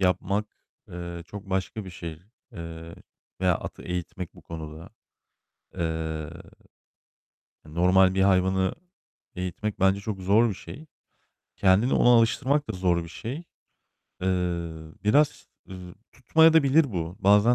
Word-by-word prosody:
yapmak, 95 +3 +1 0.4
eee, 85 -1 -7
çok 100 0 -9
başka 95 +2 -2
bir 95 - -8
şey, 85 -2 -8 0.3
eee, 85 0 -8 0.5
veya 90 -2 +3
atı - - -7
eğitmek 90 +1 -5
bu 90 - -16
konuda. 80 +1 -8 0.9
Eee, 80 -2 -3 1.4
normal 90 +4 +4
bir 95 - +2
hayvanı 95 0 +2 0.6
eğitmek 90 +3 -4
bence 95 +1 +3
çok 100 -2 -5
zor 105 +5 +4
bir - - -2
şey. 150 +9 -10 0.7
Kendini 100 +7 +3
ona - - +4
alıştırmak 130 +5 +3
da - - -2
zor 90 -3 +1
bir 85 - -10
şey. 115 +10 -6 0.9
Eee, 95 - 0 0.8
biraz, 145 +8 +3 0.2
ııı, 90 -1 -9 0.2
tutmayabilir 160 +2 +5
de 130 - -7
bu. 85 0 -3
Bazen 105 +5 +5
95 Hz, 125 wpm, -26 LUFS, 85-105 Hz, 1.4 s, tutmayabilir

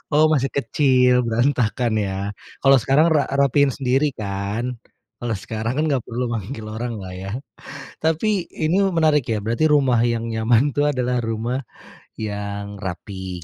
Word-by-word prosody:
Oh, 155 +1 +5
masih 135 -3 +1
kecil, 125 -1 +3
berantakan, 120 -1 +1
ya. 100 0 -2 0.2
Kalau 135 0 +6
sekarang 135 +6 +3
ra 155 -3 +3
rapihin 140 0 +3
sendiri, 135 +2 +1
kan? 105 +4 -3 0.4
Kalau 120 -1 -3
sekarang, 110 +4 -3
kan, 155 - +1
enggak 135 -5 0
perlu 120 +1 -3
manggil 110 0 -5
oranglah, 110 -5 -5
ya. 95 +1 -6 0.7
Tapi, 175 +4 0
ini 160 +3 0 0.2
menarik, 155 -5 +3
ya. 110 -2 -1
Berarti 115 +9 0
rumah 140 -5 +4
yang 115 -1 -1
nyaman, 115 +4 +2
tuh, 145 - +3
adalah 125 -1 0
rumah 115 +3 -2 0.5
yang 100 -1 -5
rapi, 95 -2 -6
120 Hz, 145 wpm, -22 LUFS, 110-140 Hz, 0.7 s, Kalau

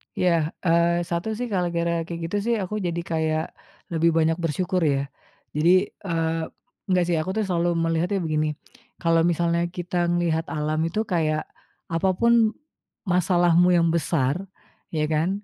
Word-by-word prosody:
Iya, 180 -1 +2 0.3
eee, 170 0 +3
satu 170 +3 -2
sih 245 +1 -3
gara-gara 170 -2 0 0.2
kayak 170 -1 -5
gitu 205 - -1
sih 235 0 +2
aku 190 +3 -4
jadi 170 0 -2
kayak 160 -1 0 0.5
lebih 165 0 +3
banyak 160 0 +2
bersyukur 180 +4 0
ya, 135 - 0 0.5
jadi 155 +3 +3 0.4
eee, 165 -1 0 0.5
enggak 185 -2 +3
sih 170 -2 +1
aku 155 +4 -2
selalu 175 -3 0
melihatnya 165 +4 0
begini, 155 -1 0 0.5
kalau 165 -1 +3
misalnya 170 0 +1
kita 175 0 -2
ngelihat 170 -2 0
alam 155 0 -2
itu 170 +6 -3
kayak, 155 -6 0 0.5
apa 165 +3 +1
pun 235 -2 +4 0.5
masalahmu 175 -1 +3
yang 170 -1 +3
besar, 150 -4 +1 0.6
iya 155 - 0
kan? 155 +3 +1
170 Hz, 145 wpm, -24 LUFS, 160-180 Hz, 0.6 s, pun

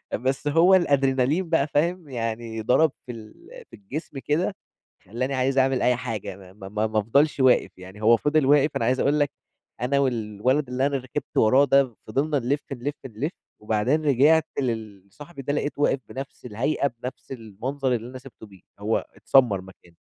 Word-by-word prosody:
بس 130 +5 -2
هو 165 +6 +5
الأدرينالين 140 0 +2
بقى 160 -4 +2
فاهم؟ 165 +2 -1
يعني 115 -2 -4
ضرب 140 +7 +3
في 125 - -6
ال 110 -2 -11 0.4
في - - -12
الجسم 160 -7 -7
كده 170 +8 -1 0.5
خلاني 125 +7 -3
عايز 130 +1 0
أعمل 130 -1 +2
أي 125 -1 +3
حاجة 115 -7 -5
ما 95 -1 -15
ما 95 -1 -10
ما 105 +2 -1
ما 110 0 -1
افضلش 140 +8 +2
واقف، 130 -6 +3
يعني 95 +3 -12
هو 115 +2 +6
فضل 145 +3 +1
واقف، 145 +2 +4
أنا - - 0
عايز 130 +3 +1
أقول 145 +2 +2
لك 145 -1 +2 0.5
أنا 130 +3 +1
والولد 125 +1 0
اللي 130 +2 0
أنا 140 -1 0
ركبت 130 +3 -7
وراه 130 +6 +5
ده 135 -4 +2
فضلنا 140 +7 0
نلف، 135 +4 -1
نلف، 135 +3 -4
نلف، 130 +7 -4 0.3
وبعدين 110 +9 0
رجعت 150 +4 +4
للصاحبي 115 - -6
ده 145 - -2
لقيته 145 0 -2
واقف 140 - +3
بنَفس 135 +1 -8
الهيئة 130 +6 0
بنَفس 125 +1 -7
المنظر 125 +4 -3
اللي 120 +1 -4
أنا 130 - -8
سِبته 130 -4 -13
بيه، 95 -3 -17 0.2
هو 110 +2 -1
اتسمر 120 -8 +3
مكانه. 95 -2 -17
130 Hz, 175 wpm, -24 LUFS, 110-145 Hz, 0.5 s, هو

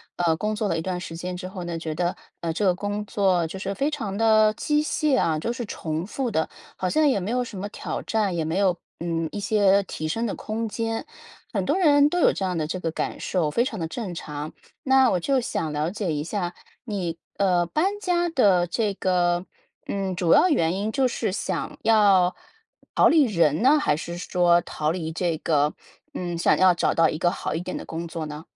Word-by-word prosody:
呃， 170 -2 +2
工 215 +3 -1
作 215 -1 -1
了 165 - 0
一 - - -2
段 180 0 -3
时 165 -1 -7
间 180 +1 -5
之 185 0 -6
后 185 -1 -7
呢， 170 -1 -3
觉 160 -1 -4
得， 175 +2 -1 0.3
呃， 165 -1 -1
这 200 +5 -1
个 185 - +4
工 205 +2 -3
作 190 -6 +1
就 190 +4 -6
是 195 +1 -3
非 285 +3 0
常 215 -9 -4
地 215 -1 +5
机 300 0 +1
械 300 -2 +1
啊， 160 -2 +1
就 230 +10 -2
是 240 -1 -4
重 160 +1 -4
复 250 0 -2
的， 160 -3 0 0.3
好 185 - -2
像 310 -1 +3
也 255 -8 +2
没 190 +4 -4
有 250 +1 +1
什 205 -5 -8
么 205 +1 -4
挑 - - -5
战， 210 -5 0
也 165 - 0
没 160 +4 -2
有， 190 -3 +3 0.2
嗯， 165 -1 -2
一 205 - -4
些 200 -1 +3
提 155 -4 -5
升 230 +9 -1
的 215 - -2
空 225 +1 -3
间， 225 +1 -3 0.5
很 - - 0
多 - - +1
人 290 -5 +5
都 355 - -2
有 - - +5
这 195 - -4
样 180 -2 -1
的 155 - -1
这 180 +4 -4
个 165 - -2
感 - - -3
受， 165 -5 0
非 235 - +2
常 220 -6 -4
地 165 - -2
正 190 -2 -5
常。 150 -1 -6 0.3
那 265 -2 +4
我 180 - +1
就 270 +7 +1
想 160 -9 -2
了 150 +3 -1
解 200 -5 -2
一 150 0 -2
下， 175 -1 -3 0.3
你 180 -7 -3 0.2
呃， 180 -3 +2
搬 385 - 0
家 350 -2 +1
的 200 - +3
这 200 +3 -1
个， 175 -1 +1 0.4
嗯， 195 -2 -2
主 175 -2 +1
要 370 - +6
原 165 - +2
因， 205 +3 -2
就 265 0 +2
是 220 - -2
想 205 - -3
要 200 -5 +4 0.6
逃 - - +6
离 310 -4 +5
人 170 - +2
呢， 280 +5 +6
还 295 - +2
是 170 +2 -6
说 175 -1 +3
逃 155 -1 -2
离 165 -2 -3
这 170 -1 -1
个 150 -2 +1 0.4
嗯， 175 -1 -3
想 170 - +3
要 185 -1 +6
找 175 - +1
到 165 -1 +5
一 155 - -3
个 175 - +3
好 - - -3
一 160 - -2
点 - - -5
的 - - -7
工 165 +1 -5
作 165 -1 -5
呢？ 150 +1 -7
185 Hz, 245 characters per minute, -24 LUFS, 170-225 Hz, 0.6 s, 要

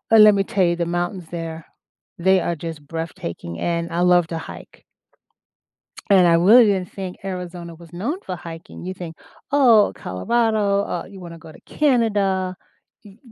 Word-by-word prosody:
Uh, 225 - +8
let 215 -1 +8
me 195 - +1
tell 195 0 0
you 170 0 +1
the 170 0 -1
mountains 175 +2 -2
there, 165 -1 -6 0.5
they 190 +2 +3
are 170 - -1
just 160 -2 -7
breathtaking, 140 - -6
and 170 -1 -2
I 170 - -1
love 175 -1 +4
to 165 - -4
hike - - -11 1.3
and 190 -3 +6
I 170 - +5
really 205 +9 +7
didn't 190 -4 0
think 190 -2 -6
Arizona 180 -2 -6
was 170 0 -16
known 225 - -3
for 185 - -4
hiking. 165 0 -10
You 185 - -4
think, 175 -3 -8 0.4
"Oh, 235 -7 +5
Colorado, 205 - 0
uh, 175 -4 -4
you 195 -1 -12
wanna 170 -1 -9
go 160 -1 -13
to - - -17
Canada," 205 -9 +1 0.5
y 200 0 -15
180 Hz, 170 wpm, -21 LUFS, 170-200 Hz, 1.3 s, Uh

